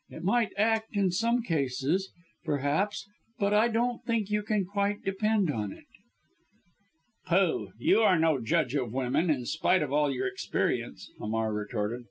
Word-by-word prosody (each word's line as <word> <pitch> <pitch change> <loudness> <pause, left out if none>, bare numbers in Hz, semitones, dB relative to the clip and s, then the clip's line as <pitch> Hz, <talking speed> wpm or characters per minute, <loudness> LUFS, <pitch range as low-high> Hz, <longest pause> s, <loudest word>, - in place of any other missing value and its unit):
"It - - -9
might 225 +3 +2
act 220 +1 +1
in 195 -2 +2
some 235 +6 +1
cases, 150 - -1 0.3
perhaps, 150 +9 -1 0.3
but 200 -3 +1
I 215 +3 +5
don't 240 +1 -1
think 230 -4 -1
you 210 0 +1
can 210 -2 0
quite 200 +2 -1
depend 200 -2 +1
on 105 -6 -3
it." - - -13 1.4
"Pooh! 180 -1 +1
You 315 -5 +3
are 195 -5 +4
no 160 -3 +2
judge 115 +2 +1
of 130 -6 -1
women, 130 +7 0
in 130 -5 0
spite 160 +5 +2
of 140 -2 -4
all 150 -1 +2
your 390 - -2
experience," 385 -3 -2
Hamar 110 0 -1
retorted. 105 +2 -3
190 Hz, 160 wpm, -29 LUFS, 140-215 Hz, 1.4 s, I